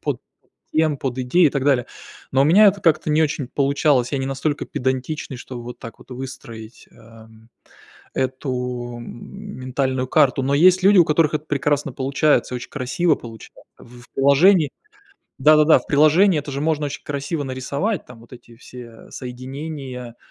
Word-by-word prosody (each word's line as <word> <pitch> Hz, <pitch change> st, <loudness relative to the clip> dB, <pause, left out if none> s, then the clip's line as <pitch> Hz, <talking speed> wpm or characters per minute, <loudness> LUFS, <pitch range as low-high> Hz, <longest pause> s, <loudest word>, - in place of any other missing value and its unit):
подтем, 155 Hz, -2 st, -3 dB
подидей, 130 Hz, +6 st, +1 dB
и -, -, +2 dB
так 140 Hz, -1 st, -2 dB
далее. 130 Hz, -4 st, +2 dB, 0.5 s
Но 135 Hz, +1 st, +4 dB
у -, -, +3 dB
меня 195 Hz, +8 st, +6 dB
это 200 Hz, 0 st, -1 dB
как-то 155 Hz, -2 st, +2 dB
не 155 Hz, +1 st, +2 dB
очень 145 Hz, -4 st, -2 dB
получалось. 140 Hz, -2 st, +1 dB
Я 140 Hz, -, 0 dB
не 135 Hz, -, -2 dB
настолько 140 Hz, +2 st, -2 dB
педантичный, 130 Hz, +2 st, -3 dB
чтобы 125 Hz, -1 st, -9 dB
вот 125 Hz, -, -9 dB
так 115 Hz, -, -10 dB
вот -, -, -18 dB
выстроить, 120 Hz, -3 st, -9 dB
эм, 110 Hz, 0 st, -18 dB, 0.6 s
эту, 125 Hz, -2 st, -3 dB
м, 200 Hz, -, -10 dB
ментальную 130 Hz, 0 st, -2 dB
карту. 135 Hz, 0 st, +3 dB
Но 140 Hz, +1 st, 0 dB
есть 185 Hz, +5 st, +5 dB
люди, 200 Hz, 0 st, +6 dB
у 175 Hz, -, +8 dB
которых 155 Hz, 0 st, +2 dB
это 155 Hz, 0 st, -3 dB
прекрасно 145 Hz, 0 st, 0 dB
получается, 135 Hz, 0 st, +1 dB
очень 125 Hz, -, -7 dB
красиво 150 Hz, +4 st, 0 dB
получается. 115 Hz, -2 st, -12 dB, 0.2 s
В 120 Hz, +1 st, -16 dB
приложении 145 Hz, +4 st, +4 dB, 0.7 s
да-да-да, 155 Hz, +2 st, +6 dB
в -, -, -18 dB
приложении 155 Hz, +5 st, +4 dB
это 145 Hz, -, -8 dB
же 135 Hz, -, -3 dB
можно 150 Hz, -1 st, 0 dB
очень 145 Hz, -, -7 dB
красиво 145 Hz, +2 st, -3 dB
нарисовать, 140 Hz, -, -3 dB
там 125 Hz, -2 st, -13 dB
вот 115 Hz, +2 st, -19 dB
эти 120 Hz, -1 st, -14 dB
все 115 Hz, -1 st, -13 dB
соединения, 130 Hz, -1 st, -7 dB
135 Hz, 160 wpm, -21 LUFS, 125-155 Hz, 0.7 s, у